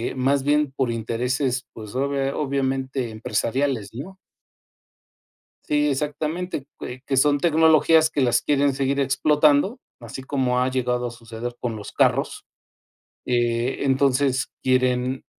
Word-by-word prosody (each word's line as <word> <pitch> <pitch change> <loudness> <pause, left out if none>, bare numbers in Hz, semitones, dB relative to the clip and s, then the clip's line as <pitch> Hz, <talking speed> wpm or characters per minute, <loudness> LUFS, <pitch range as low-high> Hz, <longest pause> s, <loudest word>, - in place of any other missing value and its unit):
más 135 +1 +1
bien 145 -1 +2
por 130 -4 0
intereses, 125 +3 -2
pues 110 -1 -10
obvia 140 0 -1
obviamente 135 -3 -1
empresariales, 115 +1 -1
¿no? 165 +11 -8 1.5
Sí, 150 0 +1
exactamente, 150 +3 -3
que 125 +1 -7
que 135 0 -2
son 145 +1 +3
tecnologías 160 0 +4
que 145 - 0
las 120 -2 +3
quieren 140 -1 +2
seguir 140 +1 0
explotando, 150 - +2 0.2
así 115 +2 -8
como 130 -3 0
ha 130 - +1
llegado 125 -1 -1
a - - -6
suceder 115 +1 -7
con 120 -2 -3
los 105 -1 -8
carros, - - +1 0.8
eh, 120 0 0
entonces 135 -1 +1
quieren 130 0 +1
135 Hz, 125 wpm, -23 LUFS, 125-145 Hz, 1.5 s, tecnologías